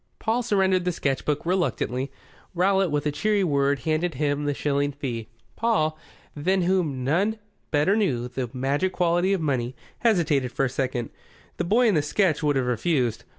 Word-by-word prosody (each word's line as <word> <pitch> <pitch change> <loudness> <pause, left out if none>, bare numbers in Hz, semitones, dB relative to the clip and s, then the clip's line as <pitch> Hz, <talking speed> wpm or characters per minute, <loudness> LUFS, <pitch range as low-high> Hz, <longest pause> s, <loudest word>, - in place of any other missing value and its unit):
Paul 230 +2 0
surrendered 190 -5 +2
the 180 - 0
sketch 140 -5 -2
book 150 +1 -1
reluctantly. 165 -7 -1 0.4
Rowlatt, 190 +1 +3
with 145 0 -1
a 150 - +1
cheery 205 +6 +1
word, 140 -4 +1
handed 160 +1 0
him 145 -1 0
the 145 - +1
shilling 145 0 0
fee. 120 -6 -5 0.3
Paul, 185 -10 +1 0.4
than 185 +5 +1
whom 170 -8 0
none 190 - +1 0.3
better 150 +6 +2
knew 130 - 0
the 125 -1 -4
magic 140 +9 -1
quality 175 +1 +2
of 195 -3 +1
money, 130 -4 -1 0.2
hesitated 165 - +2
for 135 - +1
a - - -1
second. 125 -2 -2 0.5
The - - -1
boy 230 +8 +3
in 215 - +3
the 155 - +3
sketch 160 +1 +1
would 145 -2 +1
have 130 -2 +1
refused. 125 -1 0
150 Hz, 175 wpm, -25 LUFS, 135-185 Hz, 0.5 s, Rowlatt